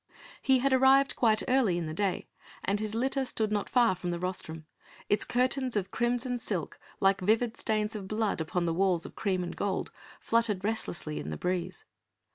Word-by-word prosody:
He 265 -1 +4
had 265 +1 +2
arrived 265 +1 +5
quite 220 -3 +3
early 250 -9 +3
in 170 - -2
the 155 - -4
day 195 +2 -1 0.4
and 200 +2 +1
his 215 0 -3
litter 265 +3 +1
stood 220 -4 -1
not 205 -1 -1
far 240 -6 +4
from 180 -1 -5
the 175 - -1
rostrum; 170 -3 -5 0.4
its 205 - +3
curtains 255 0 0
of 195 -2 -1
crimson 245 +1 0
silk, 190 -8 -4 0.2
like 195 0 +3
vivid 225 +4 +2
stains 215 0 -1
of 195 -3 -5
blood 215 -4 -1
upon 175 +2 -1
the 165 - 0
walls 180 -1 +1
of - - -9
cream 185 -3 -1
and 175 -1 -5
gold, 195 -2 -2 0.3
fluttered 230 -5 +1
restlessly 185 -7 -2
in 75 - -5
the 75 - -4
breeze. 180 0 -3
210 Hz, 190 wpm, -29 LUFS, 180-240 Hz, 0.4 s, arrived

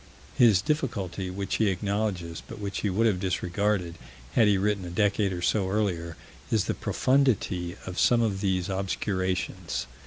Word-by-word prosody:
His 105 -6 +5
difficulty, 100 - -2
which 95 +1 -2
he 110 -2 +3
acknowledges, 95 -3 -2
but - - -8
which 100 -1 -4
he 105 - 0
would 105 +5 +1
have 100 -5 +2
disregarded 90 -1 -1 0.3
had 115 -3 +5
he 100 -1 +4
written 100 0 0
a 90 - -6
decade 100 +2 +1
or 90 -1 -4
so 95 +1 +1
earlier, 90 -5 -1 0.3
is 110 -3 +2
the - - 0
profundity 105 -10 +1
of 90 -1 -4
some 120 -1 +4
of 100 -4 -1
these 95 -3 0
obscurations. 95 - -2
95 Hz, 160 wpm, -27 LUFS, 90-105 Hz, 0.3 s, His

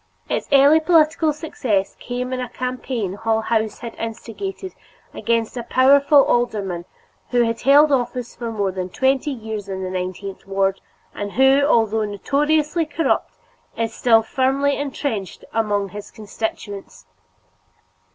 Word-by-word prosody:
Its - - -2
early 280 +3 +6
political 315 -1 +3
success 255 -10 -2
came 250 +1 -4
in 255 - -2
a 250 -1 -4
campaign 250 -5 -3
Hull 220 +2 0
House 220 -1 -1
had 235 -1 -6
instigated 370 - -6 0.4
against 230 0 -1
a 245 - -3
powerful 275 +4 +5
alderman 200 -8 -1 0.4
who 245 -1 +3
has 230 0 -2
held 290 +3 +6
office 250 -2 -1
for 235 -1 -5
more 200 -3 -1
than 185 -1 -4
twenty 265 +7 +1
years 220 -6 -5
in 190 -1 -4
the 185 - -4
nineteenth 185 +1 -5
ward, 195 0 0 0.3
and 205 -1 -5
who, 265 +2 +5
although 225 -5 +2
notoriously 295 - 0
corrupt, 315 +2 -1 0.4
is 225 0 -1
still 225 -2 +4
firmly 275 +4 +1
intrenched 270 -8 -4
among 205 -3 0
his 205 +2 -9
constituents. 205 - -6
235 Hz, 135 wpm, -21 LUFS, 205-275 Hz, 0.4 s, early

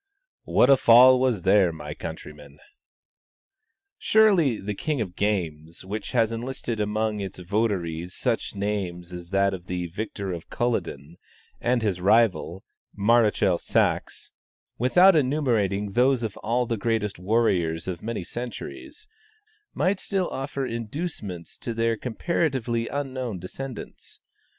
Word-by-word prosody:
"What 130 - +4
a 135 - +7
fall 125 +2 +7
was 125 -8 +1
there, 95 -2 +4
my 75 -2 -7
countrymen!" 75 -1 -9 1.4
Surely 190 - +4
the 105 +1 -4
"King 150 +7 -2
of 95 -6 -4
Games," 85 -5 -2
which 105 +2 -5
has 115 -2 +2
enlisted 120 -1 -4
amongst 105 0 -1
its 95 -2 -6
votaries 90 -3 -2
such - - -2
names 95 -4 -3
as 90 -1 -8
that 100 0 +2
of 90 -1 -8
the 90 -1 -3
victor 100 +1 -5
of 85 -1 -8
Culloden, 85 - -3 0.4
and 120 -1 +1
his 95 -4 -1
rival, 95 -4 +2 0.3
Maréchal 105 -4 +3
Saxe; - - -1 0.5
without 180 +10 +6
enumerating 115 - +1
those 125 +3 +2
of 110 -3 -3
all 120 +3 0
the 115 -1 -2
greatest 105 -3 -1
warriors 90 -6 +1
of 90 -3 -4
many 115 -4 -4
centuries, 300 - -7 0.7
might 190 +1 +1
still 190 -3 -1
offer 135 0 -3
inducements 115 - -5
to 115 - -4
their 115 0 +1
comparatively 125 -2 -1
unknown 130 -6 -4
descendants. 120 +8 -8
110 Hz, 125 wpm, -25 LUFS, 90-125 Hz, 1.4 s, a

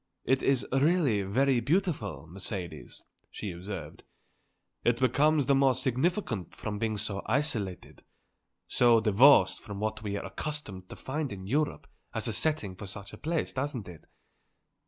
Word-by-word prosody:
"It 130 0 +2
is 135 -3 +2
really 140 - +3
very 125 +7 +2
beautiful, 145 - -1
Mercedes," 90 0 -5 0.3
she 100 - -5
observed. 90 -3 -7 0.8
"It 120 0 +2
becomes 145 +4 +3
the 140 - +3
more 135 -1 +4
significant 130 - -1
from 105 -1 -4
being 110 -1 -1
so 100 -1 -3
isolated, 110 - -1 0.7
so 120 -2 +5
divorced 110 -2 +5
from 100 -3 -7
what 110 +1 -2
we 100 -2 -3
are - - -5
accustomed 105 -12 -5
to - - -8
find 145 0 -3
in 95 -2 -7
Europe 145 +8 -1 0.3
as 110 +1 0
a 115 - -1
setting 115 -5 0
for 100 +2 -8
such 100 +1 -8
a - - -8
place, 165 0 -1
doesn't 130 -5 -3
it? 85 -3 -12
115 Hz, 150 wpm, -29 LUFS, 100-140 Hz, 0.8 s, so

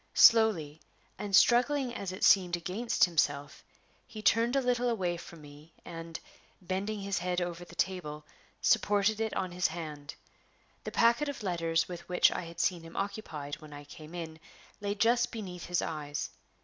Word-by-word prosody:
Slowly, 175 -10 +5 0.4
and 205 -2 0
struggling 250 +4 +4
as 195 -5 -4
it 185 - -6
seemed 180 -3 +5
against 195 +8 +1
himself, 145 -4 -1 0.4
he 230 -3 -9
turned 230 +4 +3
a - - +4
little 245 -1 +1
away 185 -7 0
from 170 -1 -11
me, 145 +2 -14
and, 165 -1 -7 0.4
bending 195 +3 -3
his 195 -2 -1
head 180 0 -1
over 175 -1 -4
the 175 - -14
table, 155 -5 -2 0.4
supported 205 +1 +3
it 220 -1 -1
on 185 -2 -2
his 180 0 +1
hand. 155 -3 -7 0.7
The - - -4
packet 235 +6 +3
of 260 -6 -6
letters 165 -3 0
with 175 -1 -8
which 180 - +5
I - - -3
had 170 0 -10
seen 175 -3 +1
him 165 0 -12
occupied 165 -8 -4
when 155 -1 -11
I 145 0 -9
came 155 +3 -11
in 160 -2 -6 0.4
lay 205 0 -2
just 235 +3 +2
beneath 185 -6 -7
his 175 0 0
eyes. 145 -2 -4
180 Hz, 170 wpm, -31 LUFS, 165-215 Hz, 0.7 s, Slowly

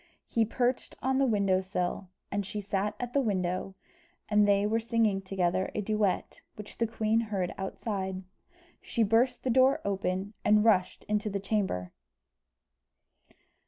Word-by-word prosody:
He 230 -1 +1
perched 245 +3 -1
on 265 +1 +2
the 275 - +3
window 200 -4 +2
sill, 185 0 -3 0.2
and 200 0 -1
she 200 +2 -5
sat 200 +1 -2
at 245 -1 -4
the 280 - +3
window, 190 -4 -1 0.5
and 210 -1 +4
they 200 0 +3
were 220 +2 +1
singing 225 -4 +1
together 185 -1 0
a 215 - 0
duet, 210 -2 -1
which 210 -1 -9
the 230 - +2
queen 220 0 +1
heard 200 -6 -2
outside. 190 -1 -4 0.6
She 230 - 0
burst 225 +4 +2
the 255 - +1
door 260 +2 +5
open, 195 0 -2
and 210 +1 +4
rushed 185 -5 +2
into 210 0 -1
the 200 0 -2
chamber. 190 - -1
205 Hz, 150 wpm, -29 LUFS, 190-225 Hz, 0.6 s, door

